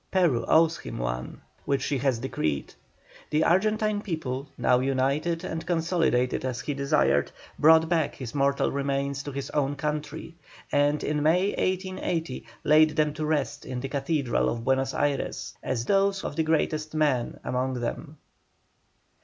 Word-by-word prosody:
Peru 170 -11 +2
owes 165 +1 +4
him - - -7
one, - - -4 0.2
which 140 -2 0
she 140 -2 -1
has 130 -2 +1
decreed. 80 - -2 0.6
The 155 +1 +2
Argentine 215 +4 +2
people, 145 -8 -4
now 125 -1 +3
united 140 +6 0
and 165 -2 -4
consolidated 165 -7 +1
as 130 -2 -2
he 145 - -3
desired, 140 +2 +2 0.3
brought 160 +1 +6
back 160 -3 0
his 130 -4 -7
mortal 140 -1 +1
remains 140 0 -1
to 145 - -6
his 140 0 -5
own 145 -1 0
country, 150 +2 -4 0.4
and 145 +1 +2
in 150 0 0
May, 175 +6 +3
1880, 185 -7 -2 0.2
laid 155 0 +5
them 150 -2 +2
to 155 0 -3
rest 145 -6 -1
in 130 -1 -5
the 135 +2 -4
Cathedral 140 -2 0
of 115 -1 -3
Buenos 135 +1 +1
Ayres, 145 -1 -1
as 120 -2 -2
those 195 +3 +2
of - - -4
the 160 - +1
greatest 155 -1 0
man 145 -6 +1
among 130 +1 -1
them. 145 +6 -5
145 Hz, 155 wpm, -27 LUFS, 130-160 Hz, 0.6 s, brought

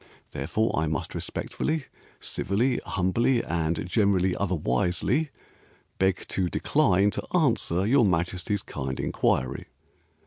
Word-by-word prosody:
Therefore 110 +1 -1
I 80 - 0
must 80 - -3
respectfully, 155 -3 -3 0.3
civilly, 120 +6 0
humbly, 115 +7 +1
and 85 0 -1
generally 95 -3 +2
otherwisely 90 - 0 0.7
Beg 95 0 +1
to 90 -2 0
decline 95 +5 +2
to 180 - -2
answer 115 - +2
your 125 +3 +4
Majesty's 90 +2 0
kind 65 -2 -5
inquiry." 65 +2 0
95 Hz, 105 wpm, -26 LUFS, 85-115 Hz, 0.7 s, your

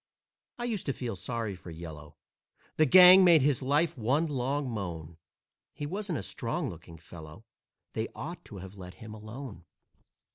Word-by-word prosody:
I 240 - -5
used 225 -8 -3
to 140 - +1
feel 120 -5 -4
sorry 105 +3 -3
for 90 - -12
"Yellow," 80 -3 -9 0.6
The 155 - +4
gang 185 +4 +9
made 170 -6 +6
his 140 -3 +2
life 145 +5 +1
one 135 +7 +1
long 140 -1 -2
moan. 85 -8 -5 0.6
He 145 +1 -5
wasn't 190 +1 -3
a - - -5
strong 125 +4 -3
looking 85 0 -12
fellow, 80 +4 -12 0.5
They 110 - -2
ought 170 +4 -7
to 105 - -10
have 95 +1 -10
let 90 0 -10
him 110 -1 -10
alone. 110 -2 -9
120 Hz, 160 wpm, -29 LUFS, 90-150 Hz, 0.6 s, gang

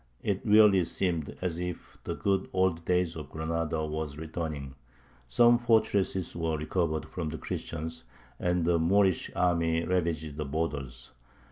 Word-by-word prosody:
It 100 -2 0
really 105 -4 +6
seemed 85 -5 -2
as 85 -2 -1
if 90 -1 -5
the - - -2
good 95 -1 0
old 95 -3 +1
days 90 -2 +1
of 75 -3 -7
Granada 80 0 -2
were 80 0 -3
returning; 75 -2 -5 0.6
some 120 - +5
fortresses 105 -5 +1
were 80 -2 -1
recovered 80 0 -1
from 85 -4 -4
the 80 - -5
Christians, 80 +1 -5 0.4
and 90 -1 +1
the 85 0 +3
Moorish 95 +1 +3
army 85 -2 +2
ravaged 80 -5 -1
the 75 - -2
borders. 70 -4 -4
85 Hz, 140 wpm, -29 LUFS, 80-90 Hz, 0.6 s, really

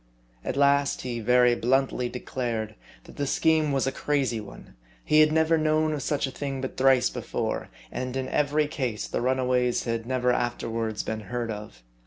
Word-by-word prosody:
At - - -3
last 140 0 +3
he 120 -2 -3
very 125 +2 +4
bluntly 125 0 +1
declared 120 -3 -3 0.3
that - - -15
the 145 - -1
scheme 155 0 +2
was 135 -1 +1
a 135 - 0
crazy 135 -7 0
one; 100 -10 -12 0.3
he 155 - +4
had 155 0 +6
never 160 +1 +3
known 155 0 +2
of 145 - -3
such 145 +2 0
a 135 - -5
thing 135 0 -4
but 130 0 -5
thrice 130 -1 +4
before; - - -3 0.2
and 125 +1 -3
in 130 -1 -2
every 150 +1 +1
case 130 -7 -3
the - - -2
runaways 125 -1 +1
had 115 0 -3
never 125 -1 +1
after 120 -1 -2
wards 115 -2 -2
been 110 0 -3
heard 115 +3 -4
of. 105 - -9
130 Hz, 185 wpm, -26 LUFS, 120-140 Hz, 0.3 s, had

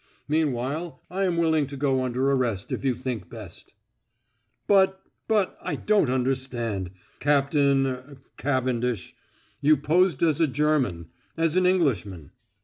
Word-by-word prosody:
Meanwhile 150 +1 -1
I 195 +2 0
am 175 -2 0
willing 160 -3 +2
to 140 0 -8
go 135 -2 +1
under 130 +2 0
arrest 120 -8 -1
if - - -3
you 130 -3 +1
think 115 -9 -5
best." - - -11 0.9
"But 190 -1 +4 0.3
but 210 -4 +1
I - - -3
don't 210 -10 +2
understand, 125 -6 -1 0.3
Captain 140 -1 +3
er 130 +2 -5 0.2
Cavendish. 125 -6 -1 0.5
You 150 +1 +5
posed 165 +2 +2
as 160 -1 +2
a 160 - +4
German 130 - 0 0.3
as 165 0 +1
an 185 0 +4
Englishman." 115 - 0
140 Hz, 135 wpm, -25 LUFS, 125-160 Hz, 0.9 s, You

